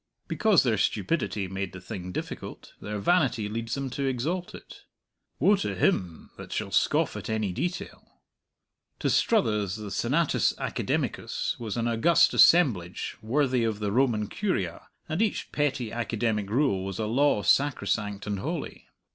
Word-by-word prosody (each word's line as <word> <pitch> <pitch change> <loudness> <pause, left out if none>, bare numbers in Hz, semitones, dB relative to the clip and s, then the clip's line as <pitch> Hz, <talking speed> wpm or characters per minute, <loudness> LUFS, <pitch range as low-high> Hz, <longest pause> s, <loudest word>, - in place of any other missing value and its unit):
Because 215 -6 +3
their 115 -6 +1
stupidity 105 - 0
made 95 0 -4
the 95 - -8
thing 90 -1 -7
difficult, - - -7
their 105 0 -4
vanity 125 - +2
leads 115 +2 -3
them 135 -2 -4
to 140 +2 -2
exalt 155 +8 -2
it. - - -13 0.6
Woe 195 +9 +5
to 195 - -2
him 90 - 0
that - - -10
shall - - -3
scoff - - +2
at - - -6
any 110 -4 -1
detail! 175 - -5 0.8
To - - 0
Struthers 105 - +2
the 105 -2 -7
Senatus 145 +10 +1
Academicus - - -2
was 115 -2 -4
an 115 0 0
august 170 +9 +4
assemblage 110 - +4
worthy 125 +2 +1
of 110 -2 0
the 105 -1 -2
Roman 115 -3 +2
Curia, 100 - -2 0.2
and 160 +6 -1
each 220 - -1
petty 135 -6 -1
academic 115 -3 -1
rule 110 -5 +1
was 95 -1 -5
a 110 - -1
law 120 -1 +2
sacrosanct 105 -4 +1
and 105 -2 -2
holy. - - -5
115 Hz, 150 wpm, -27 LUFS, 105-145 Hz, 0.8 s, Woe